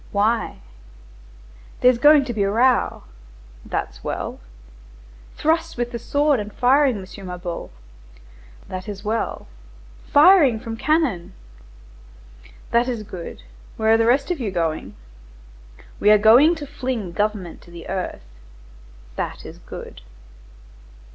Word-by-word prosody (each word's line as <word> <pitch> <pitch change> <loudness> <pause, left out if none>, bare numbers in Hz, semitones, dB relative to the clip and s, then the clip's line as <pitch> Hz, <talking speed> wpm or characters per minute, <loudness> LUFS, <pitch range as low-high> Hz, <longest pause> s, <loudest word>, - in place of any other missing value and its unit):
"Why?" 220 +3 0 1.2
"There's 250 -1 +5
going 295 +1 +6
to 245 - -4
be 215 - -2
a 195 - +2
row." 245 +5 +2 0.6
"That's - - -5
well." - - -4 1.0
"Thrusts 325 0 0
with 240 0 -2
the 235 - -5
sword 285 +2 +1
and 210 0 -6
firing, 260 +1 +3
M. 190 - -8 0.2
Mabeuf." 180 -1 -6 1.0
"That 185 +3 -6
is 200 -1 -7
well." 220 +2 -2 0.6
"Firing 290 - +6
from 225 -1 -6
cannon." 275 - 0 1.4
"That 235 +1 +3
is 235 -4 -3
good. 175 - -9 0.3
Where 220 0 +2
are - - +5
the 225 0 +2
rest 275 +6 +2
of 345 - -2
you 230 -5 -2
going?" 160 - -3 1.0
"We 205 - +3
are 210 - +8
going 240 +11 +6
to 305 -3 -7
fling 255 -8 -4
the - - -14
government 205 -5 -2
to - - -17
the 170 -1 -11
earth." 185 - -4 0.9
"That - - -4
is - - -10
good." - - -10
230 Hz, 130 wpm, -22 LUFS, 200-275 Hz, 1.4 s, are